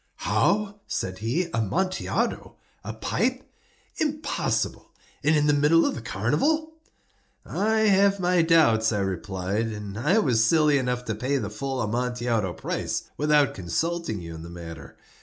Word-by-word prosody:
"How?" 205 0 0
said 95 0 -3
he. 140 +12 -1
"Amontillado? 175 - -1 0.3
A - - -5
pipe? - - -1 0.5
Impossible! 305 0 -1 0.3
And 155 +2 +4
in 150 -1 +3
the 150 - +4
middle 150 +3 +4
of - - 0
the 130 - -6
carnival!" 150 - 0 0.7
"I 220 +2 +1
have 200 -1 +4
my 180 -1 +3
doubts," 150 -10 +4
I 105 - 0
replied; 95 +3 -2
"and 105 -1 -6
I 150 - +2
was 125 - +3
silly 150 +2 +4
enough 125 -1 -2
to 110 - -2
pay 130 +6 -1
the 105 -5 -4
full 135 +4 -3
Amontillado 120 -3 -1
price - - -4
without 150 -1 +3
consulting 110 - -2
you 85 0 -7
in 80 - -8
the 85 - -9
matter. 80 -4 -10
125 Hz, 145 wpm, -25 LUFS, 105-170 Hz, 0.7 s, And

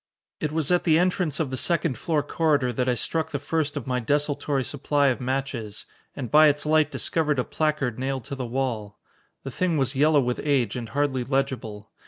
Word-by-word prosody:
It 150 - -2
was 160 0 -1
at 180 - +3
the 160 -2 +4
entrance 180 -4 +1
of 150 -5 -1
the 130 - -2
second 165 -2 0
floor 150 +4 -1
corridor 145 -5 +1
that 125 +2 0
I 125 - +2
struck 160 +6 -1
the 145 - -2
first 145 +1 -2
of 135 - -5
my 125 -1 -1
desultory 145 +2 0
supply 145 +1 +1
of 130 - -2
matches, 125 -5 -3 0.3
and 130 -5 -5
by 155 +1 +7
its 145 0 +1
light 155 0 +3
discovered 150 -3 0
a 125 - +1
placard 150 -7 -1
nailed 135 -1 -2
to - - -7
the 135 - -4
wall. 115 -5 -3 0.5
The 135 - -6
thing 175 +3 0
was 135 -1 0
yellow 150 +2 +4
with 125 -2 -1
age 135 -7 +1
and 120 -3 -5
hardly 140 -3 0
legible. 120 -6 -3
140 Hz, 205 wpm, -25 LUFS, 125-155 Hz, 0.5 s, by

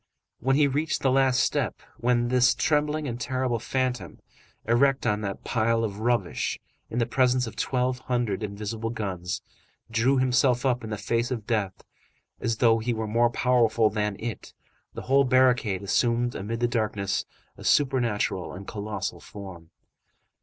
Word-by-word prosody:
When 135 +3 +2
he 150 - +4
had 140 -2 +2
reached 155 +3 -1
the 135 - +3
last 135 -1 +3
step, - - 0 0.2
when 120 0 +1
this 125 0 +4
trembling 150 -1 +1
and 120 0 -5
terrible 130 -2 -1
phantom, 125 - -2 0.5
erect 135 +4 +3
on 105 0 +1
that 100 -2 -4
pile 115 0 +1
of 105 -2 -3
rubbish 115 -5 0 0.3
in 115 - -5
the 120 - +2
presence 125 +1 +2
of 115 - -8
twelve 125 0 0
hundred 120 -5 -1
invisible 105 +2 -4
guns, 95 -6 -4 0.5
drew 120 +4 +2
himself 130 0 +2
up 125 -2 +1
in 110 - -6
the 105 - -3
face 115 +3 -1
of 115 -5 -4
death 105 -5 -2 0.6
and - - -7
as 115 -1 0
though 115 0 +4
he 115 +1 -1
were 110 0 -2
more 115 +3 +2
powerful 115 -3 +2
than 105 -1 -1
it, 115 -4 -6 0.4
the - - -6
whole 135 +1 +4
barricade 125 -7 +3
assumed 120 +4 +1
amid 115 +4 -4
the 120 - +3
darkness, 110 -4 -1 0.3
a - - -12
supernatural 120 -9 +1
and 95 +2 -9
colossal 105 -3 -4
form. 95 -5 -10
120 Hz, 165 wpm, -26 LUFS, 105-130 Hz, 0.6 s, he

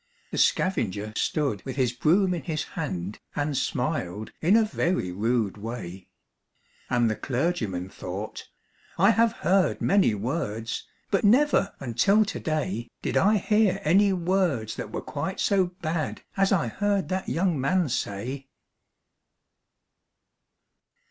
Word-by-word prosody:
The - - -2
scavenger 110 - +1
stood 140 -10 -1
with 130 - -5
his 125 -3 +1
broom 180 - +3
in 170 - -3
his 155 +2 -2
hand, 105 - -4 0.2
And 145 0 -1
smiled 125 - -2
in 185 +7 +5
a 225 - +5
very 175 - -1
rude 110 +1 0
way; 100 -4 -7 0.8
And 120 -2 +3
the 110 - 0
clergyman 120 - -2
thought, 95 +3 -6 0.5
'I 195 +5 +6
have 230 +1 +3
heard 185 +2 +3
many 195 - +3
words, 115 -1 -3 0.2
But 195 - +2
never, 240 -1 +4
until 135 - +3
to - - -4
day, 120 - -2
Did - - -2
I 210 +2 +4
hear 210 0 +2
any 195 +6 +4
words 175 - 0
that - - -6
were - - -4
quite - - -4
so 195 -2 +3 0.2
bad 155 -1 -2
As 195 0 +2
I 170 -10 +2
heard 200 - 0
that 185 0 -2
young 170 -4 +1
man 180 +5 +2
say.' 130 +3 -3
150 Hz, 135 wpm, -26 LUFS, 115-190 Hz, 0.8 s, I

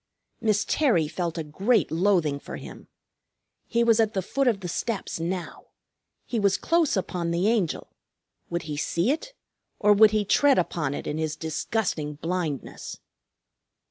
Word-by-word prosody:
Miss 215 -2 +1
Terry 225 - +2
felt 170 +1 -3
a 165 - -2
great 190 +5 +1
loathing 165 -4 +2
for - - -8
him. - - -11 0.8
He 235 -1 +2
was 230 -1 +4
at 220 -2 +2
the 190 - 0
foot 270 +7 0
of 215 -5 +2
the 180 - -4
steps 205 +1 -3
now. 175 +1 -4 0.6
He 235 - -2
was 200 -1 +3
close 330 -8 +2
upon 180 -2 -2
the 170 +4 +1
Angel. 215 -8 0 0.6
Would 170 0 -2
he 150 -2 -5
see 170 - +1
it, 325 +12 -4 0.4
or 210 -1 +5
would 215 +1 +7
he 210 -1 0
tread 280 +6 +4
upon 150 -5 -1
it - - -6
in 150 - -3
his 155 -1 -1
disgusting 160 -1 -2
blindness? 165 -3 -4
185 Hz, 160 wpm, -26 LUFS, 165-220 Hz, 0.8 s, would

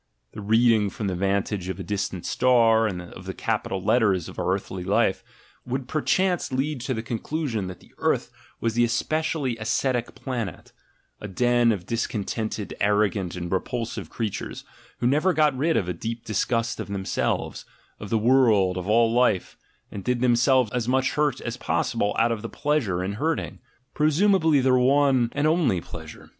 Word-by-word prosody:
The - - -8
reading 110 0 +3
from 105 - -5
the 95 -2 -1
vantage 95 0 -1
of 95 0 -4
a - - -4
distant 95 -1 -3
star 115 -3 +4
of 90 -3 -7
the - - -5
capital 95 - -2
letters 95 -5 +2
of - - -9
our - - 0
earthly 95 -1 -3
life, 100 +3 +1 0.4
would 130 +1 -4
perchance 180 +5 0
lead 135 +1 -1
to 130 0 -2
the 110 - -4
conclusion 120 - -3
that 90 -1 -9
the - - -21
earth - - 0 0.3
was 115 -1 -1
the 120 +1 +3
especially 145 +1 -1
ascetic 120 +2 -1
planet, 120 - -5 0.5
a 105 - -6
den 120 +3 +2
of 95 -5 -3
discontented, 110 -1 -3
arrogant, 100 -3 +1
and 85 -1 -5
repulsive 115 +5 -3
creatures, 110 -4 -4 0.4
who - - 0
never 155 +9 +3
got 150 -4 +3
rid 160 +5 +1
of 90 - 0
a 90 - -1
deep 115 +7 -5
disgust 115 +2 -1
of - - -4
themselves, 100 -1 -2 0.4
of 105 - -7
the 115 - +2
world, 110 -6 +3
of 90 +1 -4
all 115 +1 +3
life, 120 -6 +2 0.4
and 100 - -6
did 125 -1 0
themselves 125 -1 +3
as 120 -2 -2
much 130 +1 +2
hurt 145 -4 0
as 120 0 -4
possible 110 -4 -1
out 115 +1 +3
of 115 -2 -2
pleasure 120 -12 0
in 95 +2 -2
hurting 160 +1 -1 0.2
— 130 +1 -44
presumably 160 -1 +3
their 130 0 +4
one 130 -2 +3
and 145 - 0
only 155 - +2
pleasure. 80 -2 -10
115 Hz, 170 wpm, -25 LUFS, 100-130 Hz, 0.5 s, star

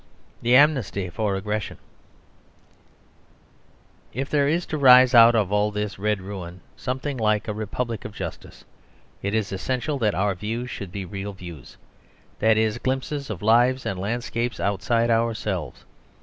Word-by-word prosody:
THE 120 +2 +3
AMNESTY 125 - +3
FOR 105 +1 -1
AGGRESSION 105 +2 -3 2.4
If 135 +4 -4
there 145 -2 +3
is 170 +4 0
to 155 - -4
rise 130 -1 +7
out 115 0 +8
of 105 -4 +1
all 105 0 +2
this 105 -3 -4
red 105 -1 0
ruin 90 -3 -8
something 130 +2 -4
like 105 -2 +1
a 105 - -2
republic 110 +2 -4
of - - -7
justice, - - -8 0.6
it 100 +2 -2
is 110 -3 -1
essential 130 +9 -2
that 105 -4 +1
our 100 0 +1
views 115 +6 -4
should 100 -7 -7
be 100 0 -5
real 100 +3 -6
views; 85 -8 -11 0.6
that 110 0 +4
is, 110 +1 +1
glimpses 135 +2 -3
of 105 -3 -6
lives 120 +4 +3
and 95 - -3
landscapes 115 +2 -3
outside 115 +4 +1
ourselves. 110 - -1
110 Hz, 150 wpm, -24 LUFS, 100-125 Hz, 2.4 s, out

